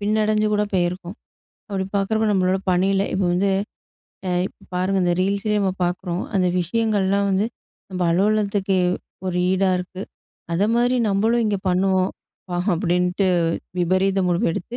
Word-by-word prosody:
பின்னடஞ்சு 215 +1 +1
கூட 210 0 +2
பேயிருக்கோம். 175 +2 -1 0.5
அப்படி 195 -2 -1
பாக்குறப்போ, 220 +2 +1
நம்மளோட 185 -1 +2
பணியில 195 +2 +2
இப்ப 190 - 0
வந்து 195 +3 +2 0.8
அ - - 0 0.2
இப்ப - - -14
பாருங்க 190 +2 +1
இந்த 175 0 +2
Reelsலயே 200 +2 0
நம்ம 190 -2 +1
பாக்குறோம். 175 0 -2
"அந்த 185 -1 +2
விஷயங்கள்லாம் 200 0 +1
வந்து, 195 +3 +1 0.4
நம்ம 185 -1 -3
அலுவலகத்துக்கு, 200 0 +1 0.5
ஒரு 180 -1 -1
ஈடா 190 0 +2
இருக்கு. 180 +1 -6 0.5
அதமாரி, 235 +7 +2
நம்மளும் 225 +4 +2
இங்க 205 -2 0
பண்ணுவோம்" 185 +1 +2 0.4
பா 175 - -1 0.2
அப்படின்ட்டு 180 +2 +1 0.5
விபரீத 185 +2 +2
முடிவு 175 -1 +1
எடுத்து, 230 +8 -5
195 Hz, 135 wpm, -22 LUFS, 180-205 Hz, 0.8 s, கூட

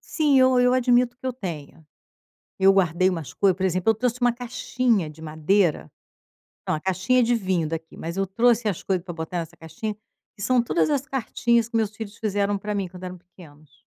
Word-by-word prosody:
sim, 295 -4 +2
eu 260 -1 +5
eu 250 0 +4
admito 245 -1 +3
que 260 - -7
eu 255 - -1
tenho". 165 - -7 0.7
Eu 195 0 +6
guardei 185 -1 +2
umas 165 -8 -4
coisas, 190 +2 +2
por 190 - -2
exemplo, 185 +3 +2
eu - - +3
trouxe 245 +2 -2
uma 245 -1 +3
caixinha 240 -5 -1
de 155 +1 -13
madeira. 160 - +1 0.8
Não, - - +1
a - - -6
caixinha 190 +8 +1
de 240 +1 +2
vinho 185 -7 0
daqui, 160 0 -6
mas 170 +2 -6
eu 195 0 0
trouxe 230 +3 +2
as 195 - -3
coisas 185 -3 -1
pra 180 - -6
botar 160 +1 -5
nessa 170 0 -6
caixinha, 210 +7 -6 0.4
que 200 - -9
são 245 +3 +3
todas 280 +9 +1
as 285 -2 0
cartinhas 235 -3 0
que 230 - -3
meus 215 -2 0
filhos 205 -1 -8
fizeram 205 -1 0
pra 210 +2 -4
mim 195 -2 -2
quando 180 +1 -11
eram 180 0 -7
pequenos. 155 -4 -18
195 Hz, 205 wpm, -24 LUFS, 175-240 Hz, 0.8 s, Eu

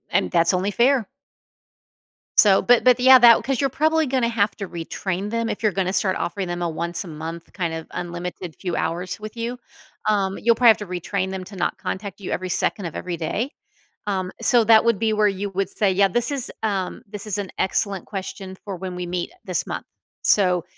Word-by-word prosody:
And, 90 - +1
that's 170 +2 +3
only 185 +3 0
fair. 240 0 +3 1.3
So, 200 -2 +6
but 245 -1 +4
but 250 -1 +5
yeah, 260 +1 +8
that 235 -1 +7
'cause 265 +1 -1
you're 275 - +2
probably 315 +3 +2
gonna 255 -3 +1
have 215 -2 +1
to 200 - -5
retrain 180 +3 -4
them 230 0 -1
if - - -4
you're 215 -2 +2
gonna 185 -1 0
start 190 -1 +1
offering 190 +1 -3
them 175 0 -4
a 170 - 0
once-a-month 165 0 -5
kind 170 -4 -2
of 160 0 -6
unlimited 175 -1 -6
few 180 -3 -3
hours 175 +3 -2
with 215 +1 -8
you, 235 +2 -4 0.5
um, 195 -2 +1
you'll 235 +1 +3
probably 240 0 +6
have 220 - +6
to 210 - -7
retrain 185 +2 -2
them 190 -1 -4
to 200 - -11
not 180 - -1
contact 195 0 -5
you 190 - -5
every 185 0 -2
second 190 +2 0
of 165 - -6
every 175 -2 -4
day, 215 - -2 0.6
um, 190 -2 -1
so 240 -3 +4
that 220 0 +6
would 230 -3 +2
be 220 +1 +1
where 210 -1 +3
you 200 0 -3
would 195 0 -2
say, 205 -1 +1
"Yeah, 195 +1 +4
this 240 +7 0
is 270 -3 -1
um, 195 -4 -2
this 205 0 -6
is 210 -1 -1
an 200 -2 -4
excellent 195 0 0
question 190 -1 -6
for 195 -2 -5
when 180 0 -6
we 180 0 -4
meet, 175 0 -3
uh, - - -23
this - - -1
month, - - -5 0.4
so, 180 -4 +3
195 Hz, 215 wpm, -23 LUFS, 180-225 Hz, 1.3 s, yeah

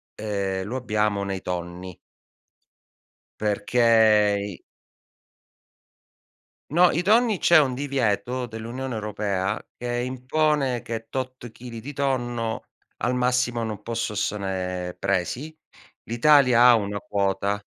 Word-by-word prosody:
ehm, 100 -3 -2
lo 115 +6 -5
abbiamo 105 -5 0
nei 95 -1 -3
tonni. 90 0 -5 1.4
Perché 105 -1 +3
i 100 -4 -7 2.1
No, 175 +4 +5
i 170 - 0
tonni 220 0 +3
c'è 170 -2 +6
un 135 -4 +2
divieto 125 -3 -1
dell'Unione 120 +3 -5
Europea 105 -2 -2 0.2
che 120 0 -3
impone 130 +1 0
che 115 -1 -6
tot 130 -1 -5
chili 115 0 -9
di 140 +6 -7
tonno 120 -5 -2 0.3
al 125 - -1
massimo 125 -1 +1
non 105 -2 -5
posso 115 -1 -3
ossone 95 -3 -3
presi. 100 - -2 0.5
L'Italia 125 0 +5
ha 125 -1 +8
una 105 -2 -2
quota. 100 +1 -1
115 Hz, 110 wpm, -24 LUFS, 100-125 Hz, 2.1 s, ha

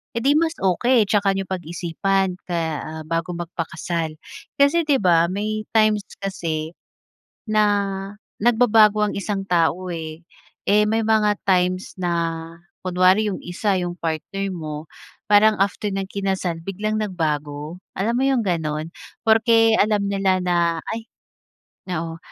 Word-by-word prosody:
eh, 230 - -1
di 280 - +4
mas 330 0 0
okey, 225 +6 +3
tsaka 200 -2 +3
niyo 195 - -2
pag-isipan 180 +2 -1
kaya, 165 -2 -1
ah, 160 0 -7
bago 165 +2 -2
magpakasal. 165 -1 -4 0.4
Kasi 285 +4 +5
di 280 -2 +4
ba, 170 -3 +4
may 215 +2 -2
times 215 -1 +4 0.2
kasi, 165 -5 -3 0.8
na 215 0 +4 0.8
nagbabago 220 -2 +5
ang - - -4
isang 200 0 -2
tao, 175 +1 +1
eh. 160 0 -6 0.4
Eh, 210 +1 +5
may 225 +1 +1
mga 210 -2 +3
times 185 0 +1
na 165 -2 -2 0.4
kunwari 185 +4 +3
yung 185 - -4
isa, 190 +3 0
yung 175 0 -4
partner 170 +5 -3
mo, 155 -2 -6 0.4
parang 210 +1 +6
after 200 +2 0
niyang 195 0 -3
kinasal, 190 -3 -2
biglang 215 +3 -2
nagbago, 155 -4 -3 0.2
alam 215 +5 0
mo 260 - +1
yung 265 -3 +2
gano'n? 160 -3 -2 0.4
Porke 225 0 +5
alam 210 -1 +2
nila 195 -1 +1
na, 170 -2 +1
ay 225 0 -6 0.9
oo, 165 0 -4
190 Hz, 135 wpm, -22 LUFS, 165-215 Hz, 0.9 s, parang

